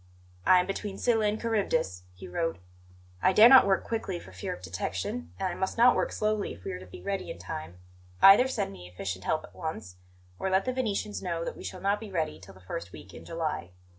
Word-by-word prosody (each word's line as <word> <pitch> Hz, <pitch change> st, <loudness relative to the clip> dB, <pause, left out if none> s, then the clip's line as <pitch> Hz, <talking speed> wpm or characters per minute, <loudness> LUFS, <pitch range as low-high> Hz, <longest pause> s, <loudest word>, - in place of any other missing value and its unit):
"I 185 Hz, -, +8 dB
am 180 Hz, -, +1 dB
between 195 Hz, +1 st, -4 dB
Scylla 225 Hz, -3 st, +2 dB
and 210 Hz, +1 st, -1 dB
Charybdis," 160 Hz, -, -1 dB
he 90 Hz, -, -10 dB
wrote. 165 Hz, -, -2 dB, 0.6 s
"I 190 Hz, -, +4 dB
dare 215 Hz, +4 st, +9 dB
not 265 Hz, -5 st, +9 dB
work 190 Hz, -1 st, +2 dB
quickly, 200 Hz, -6 st, -3 dB
for 95 Hz, -, -13 dB
fear 90 Hz, -1 st, -5 dB
of 90 Hz, -, -7 dB
detection, 85 Hz, -1 st, -4 dB
and -, -, 0 dB
I 180 Hz, -, -2 dB
must 190 Hz, +4 st, -2 dB
not 245 Hz, +2 st, +6 dB
work -, -, 0 dB
slowly 215 Hz, -1 st, -1 dB
if 90 Hz, -, -17 dB
we -, -, -4 dB
are 90 Hz, -, -5 dB
to 95 Hz, -, -12 dB
be 90 Hz, -, -11 dB
ready 195 Hz, -1 st, -3 dB
in -, -, -6 dB
time. 85 Hz, -1 st, -7 dB, 0.4 s
Either 200 Hz, +7 st, +8 dB
send 260 Hz, -, -2 dB
me 90 Hz, -2 st, -11 dB
efficient 95 Hz, +1 st, -5 dB
help 155 Hz, -, 0 dB
at -, -, -13 dB
once, 110 Hz, -, -6 dB, 0.4 s
or 190 Hz, -, -1 dB
let 190 Hz, +1 st, +2 dB
the 255 Hz, -, -1 dB
Venetians 215 Hz, -4 st, -2 dB
know 170 Hz, -2 st, -2 dB
that -, -, -4 dB
we -, -, -10 dB
shall 185 Hz, -, -6 dB
not 200 Hz, +1 st, +1 dB
be 220 Hz, -, -8 dB
ready 160 Hz, -4 st, -2 dB
till 95 Hz, 0 st, -14 dB
the -, -, -15 dB
first 90 Hz, -1 st, -6 dB
week 95 Hz, 0 st, -12 dB
in -, -, -11 dB
July." 160 Hz, -, -3 dB
175 Hz, 235 wpm, -29 LUFS, -, 0.6 s, dare